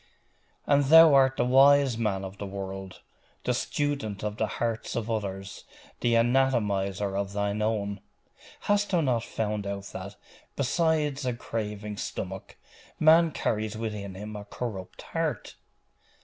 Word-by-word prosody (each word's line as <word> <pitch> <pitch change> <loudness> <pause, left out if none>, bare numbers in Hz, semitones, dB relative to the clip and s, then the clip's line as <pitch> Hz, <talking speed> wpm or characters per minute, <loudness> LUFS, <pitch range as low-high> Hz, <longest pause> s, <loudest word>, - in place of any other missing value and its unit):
'And 145 0 +3
thou 160 +1 +8
art 135 -1 +4
the - - +2
wise 135 0 +5
man 105 -4 -1
of 95 +1 -9
the 100 - -4
world 95 -1 -7 0.4
the - - +1
student 140 -9 -2
of 105 0 -3
the 110 - 0
hearts 115 -2 -2
of 115 0 -2
others 95 -3 -4 0.4
the 120 -1 +2
anatomiser 105 -6 +1
of 100 0 -2
thine 100 +1 -1
own? 100 -2 -1 0.6
Hast 205 0 +1
thou 175 -3 +2
not 125 -6 +1
found 105 -3 -3
out 100 0 -4
that, - - -7 0.4
besides 150 0 +1
a 125 -1 -1
craving 105 -3 -5
stomach, - - -6 0.4
man 165 +2 +6
carries 110 -6 -2
with 110 -1 -3
him 100 +1 -7
a 105 - -6
corrupt 100 -4 -6
heart? - - -2
110 Hz, 140 wpm, -27 LUFS, 100-135 Hz, 0.6 s, thou